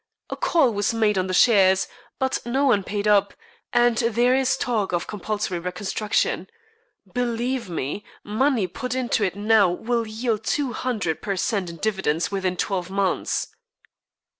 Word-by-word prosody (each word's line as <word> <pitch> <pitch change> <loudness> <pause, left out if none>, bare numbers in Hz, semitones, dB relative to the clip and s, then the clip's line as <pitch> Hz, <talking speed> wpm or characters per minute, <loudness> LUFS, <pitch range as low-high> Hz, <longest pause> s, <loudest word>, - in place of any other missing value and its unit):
A - - -2
call 275 -9 +2
was 205 +3 0
made 215 -2 +2
on 185 - -1
the - - -3
shares, 190 -4 +5 0.3
but 265 -1 0
no 265 +4 0
one 210 -7 +3
paid 205 +1 -2
up, 205 -1 +3 0.4
and 240 -2 +3
there 240 +2 +2
is 260 -1 +2
a - - -11
talk 215 -6 -1
of 175 - 0
compulsory 210 -2 -3
reconstruction. 190 +4 -1 0.7
Believe 245 -1 -1
me, 165 +4 -3 0.2
money 230 +1 +1
put 250 +8 -4
into 245 -4 0
it 190 -1 0
now 210 -1 +4
will 230 +6 -1
yield 220 0 -2
two 275 0 -1
hundred 210 -11 -2
per 200 -2 -2
cent 190 -1 -1
in 170 - -8
dividends 190 -6 -1
within 190 -2 -1
twelve 180 -1 -2
months." 195 0 -1
210 Hz, 160 wpm, -23 LUFS, 190-240 Hz, 0.7 s, shares